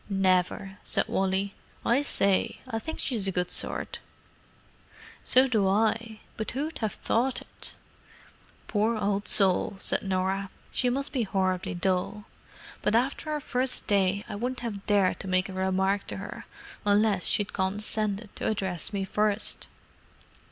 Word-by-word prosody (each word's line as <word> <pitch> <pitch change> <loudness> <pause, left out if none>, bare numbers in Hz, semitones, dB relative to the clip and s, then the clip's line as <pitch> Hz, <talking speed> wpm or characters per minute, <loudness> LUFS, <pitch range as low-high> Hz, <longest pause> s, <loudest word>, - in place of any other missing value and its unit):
"Never," 190 0 +1
said - - +2
Wally. 195 +1 0 0.3
"I 245 +4 +4
say, 200 -9 +1
I 225 -3 -2
think 320 +8 -6
she's 220 -7 0
a - - +1
good 180 -1 -1
sort." - - -2 1.2
"So 255 +1 +6
do 215 -6 +2
I. 220 +2 +1 0.2
But 220 - -3
who'd 300 +6 -3
have 220 -2 -1
thought 255 +2 0
it!" - - -10 0.9
"Poor 220 +2 +1
old 205 -1 0
soul!" 195 0 +4
said - - +1
Norah. 190 +1 -1 0.2
"She 250 - +2
must 275 +3 -1
be 255 -4 0
most 195 - -17
horribly 185 -2 0
dull. 190 +3 -1 0.6
But 210 - +2
after 265 +6 0
our 305 -1 0
first 255 -2 -1
day 200 0 +2
I - - -6
wouldn't 245 +4 -3
have 210 -5 -5
dared 200 -3 +3
to - - -6
make 185 0 +2
a 190 - -8
remark 190 +1 +1
to - - -5
her - - -7 0.4
unless 205 -2 +3
she'd 205 - +1
condescended 210 +2 -1
to - - -2
address 190 -5 -2
me 200 -2 -1
first." 210 +2 0
205 Hz, 150 wpm, -28 LUFS, 190-225 Hz, 1.2 s, So